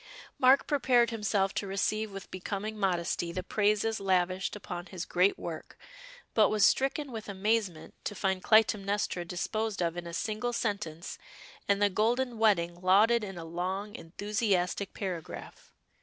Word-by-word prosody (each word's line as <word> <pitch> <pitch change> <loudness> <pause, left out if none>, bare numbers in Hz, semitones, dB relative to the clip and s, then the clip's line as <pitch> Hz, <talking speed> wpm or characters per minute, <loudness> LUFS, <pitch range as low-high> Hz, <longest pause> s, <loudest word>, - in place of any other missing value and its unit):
Mark 260 +2 +6
prepared 250 -5 +3
himself 210 -3 0
to 200 - -3
receive 210 +2 -1
with 195 -1 -9
becoming 200 +3 -4
modesty 175 -4 -1
the 185 +1 -4
praises 215 +2 +1
lavished 185 0 0
upon 175 -3 -6
his 180 -3 -6
great 180 +3 +2
work, 165 -2 -7 0.6
but 215 -2 +5
was 210 -2 +4
stricken 275 +1 +1
with 220 -2 -6
amazement 200 -4 -1
to 205 - -4
find 190 -1 0
Clytemnestra 205 -4 +2
disposed 210 +4 -2
of 170 -1 0
in 175 -1 -5
a 170 - -7
single 220 +5 -2
sentence, 200 -7 -3 0.5
and 200 0 +3
the 205 0 +4
Golden 235 +4 0
Wedding 175 -6 +2
lauded 210 +5 +4
in 195 -3 -6
a 165 - -6
long 190 +5 -3
enthusiastic 200 0 -1
paragraph. 180 -5 -6
200 Hz, 145 wpm, -30 LUFS, 180-220 Hz, 0.6 s, Mark